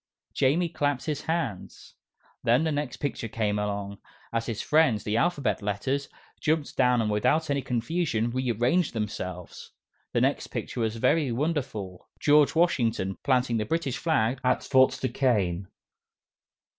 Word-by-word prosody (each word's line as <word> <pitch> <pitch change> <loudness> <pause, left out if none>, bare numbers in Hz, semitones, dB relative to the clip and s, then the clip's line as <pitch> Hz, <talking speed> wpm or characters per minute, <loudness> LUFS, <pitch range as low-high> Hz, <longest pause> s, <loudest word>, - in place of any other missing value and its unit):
Jamie 160 +7 +2
clapped 145 -5 -1
his 150 -3 -2
hands. 160 - -4 0.5
Then 120 +6 +3
the 160 - 0
next 145 -3 -3
picture 140 -5 -3
came 105 -2 -1
along, 100 -1 -3 0.3
as 115 0 -1
his 115 -3 -3
friends, 150 -9 +3
the 105 - -1
Alphabet 140 - +1
Letters, 130 +8 -2 0.3
jumped 155 -2 0
down 125 -2 +3
and 105 - -1
without 150 +9 +1
any 140 -1 +1
confusion 120 -2 -1
re 130 0 -1
arranged 125 - +1
themselves. 95 -5 -5 0.4
The - - +2
next - - +1
picture - - -5
was 110 -1 0
very 140 +4 +2
wonderful 125 - -3
George 150 0 +4
Washington 115 - +1
planting 125 -3 +1
the 110 - 0
British 140 -1 -1
Flag 130 -6 +1
at 125 - +1
Fort 130 -1 +4
Duquesne. 105 -8 0
125 Hz, 145 wpm, -27 LUFS, 110-145 Hz, 0.5 s, George